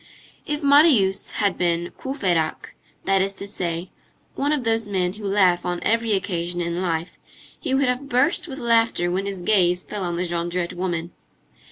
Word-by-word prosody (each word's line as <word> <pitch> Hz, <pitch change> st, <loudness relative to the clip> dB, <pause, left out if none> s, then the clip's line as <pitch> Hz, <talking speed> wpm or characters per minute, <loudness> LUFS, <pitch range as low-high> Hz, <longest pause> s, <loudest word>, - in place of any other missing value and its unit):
If 295 Hz, 0 st, -2 dB
Marius 280 Hz, -, +4 dB
had 200 Hz, -3 st, 0 dB
been 170 Hz, -1 st, 0 dB
Courfeyrac, 185 Hz, -, -2 dB, 0.3 s
that 195 Hz, 0 st, +3 dB
is 195 Hz, +1 st, -1 dB
to 200 Hz, -, -7 dB
say, 175 Hz, -3 st, -3 dB, 0.4 s
one 285 Hz, +2 st, -1 dB
of 295 Hz, -4 st, 0 dB
those 225 Hz, -1 st, 0 dB
men 185 Hz, -3 st, 0 dB
who 210 Hz, 0 st, -6 dB
laugh 185 Hz, -3 st, +3 dB
on 175 Hz, 0 st, -2 dB
every 230 Hz, 0 st, +1 dB
occasion 175 Hz, -3 st, -2 dB
in 170 Hz, +1 st, -2 dB
life, 170 Hz, -1 st, -3 dB, 0.4 s
he 265 Hz, -, -1 dB
would 275 Hz, +1 st, +2 dB
have 250 Hz, +3 st, -2 dB
burst 280 Hz, +9 st, +2 dB
with 270 Hz, -4 st, -7 dB
laughter 230 Hz, -8 st, +2 dB
when 190 Hz, +2 st, -1 dB
his 195 Hz, -3 st, -5 dB
gaze 180 Hz, -3 st, +2 dB
fell 205 Hz, -2 st, -5 dB
on 175 Hz, -1 st, -2 dB
the 180 Hz, -, -1 dB
Jondrette 170 Hz, 0 st, -2 dB
woman. 175 Hz, -2 st, -3 dB
190 Hz, 175 wpm, -23 LUFS, 175-230 Hz, 0.4 s, Marius